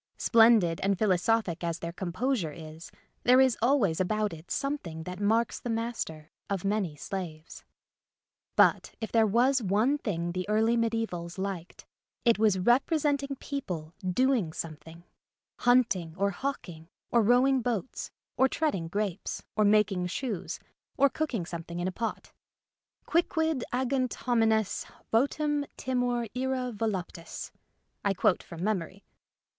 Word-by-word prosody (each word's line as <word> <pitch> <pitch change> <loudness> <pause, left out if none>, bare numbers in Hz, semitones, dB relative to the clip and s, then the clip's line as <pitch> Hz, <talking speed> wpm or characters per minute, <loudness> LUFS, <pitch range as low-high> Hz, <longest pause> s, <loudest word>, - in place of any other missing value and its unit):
Splendid 225 -8 +5
and 195 0 +1
philosophic 190 -2 +1
as 170 -1 -1
their 170 0 -5
composure 190 - -1
is 160 +1 -10 0.3
there 250 +1 +5
is 260 -3 +5
always 230 - +3
about 210 +1 0
it 160 +1 -11
something 230 - -3
that 180 +2 -7
marks 225 +3 +1
the 245 - -6
master 225 -10 -3 0.2
of 195 -2 -2
many 195 -6 0
slaves. 165 -1 -6 0.9
But - - +4
if 220 - -5
there 225 -1 +4
was 250 +5 +3
one 220 +8 +2
thing 175 -8 -2
the 185 +3 -4
early 220 +2 +3
medisevals 225 -7 -2
liked 190 -3 -5 0.4
it 230 -2 +4
was 215 -3 +4
representing 280 - +2
people 180 - -5
doing 205 -2 +1
something 160 +1 -8 0.3
— - - -64
hunting 195 -10 +3
or 200 +1 +1
hawking, 175 - -5 0.2
or 235 - +5
rowing 250 +4 +4
boats, 240 0 -3 0.3
or 265 - +5
treading 225 - -1
grapes, 200 +1 -3
or 215 - +3
making 205 -3 +3
shoes, 215 +1 -4 0.4
or 280 +1 +5
cook 310 -2 -2
ing 180 -6 -2
something 170 0 -6
in 175 - -1
a - - -1
pot. 225 +4 -4 0.4
'* - - -52
Quicquid 320 -4 +1
agunt 255 0 0
homines, 225 -3 +1 0.3
votum, 290 +4 +2
timor, 245 -2 0
ira 255 -1 -1
voluptas." 190 -5 -4 0.5
(I 200 -1 +1
quote 180 - +2
from 170 0 -8
memory.) 195 -2 -2
215 Hz, 140 wpm, -29 LUFS, 175-245 Hz, 0.9 s, Splendid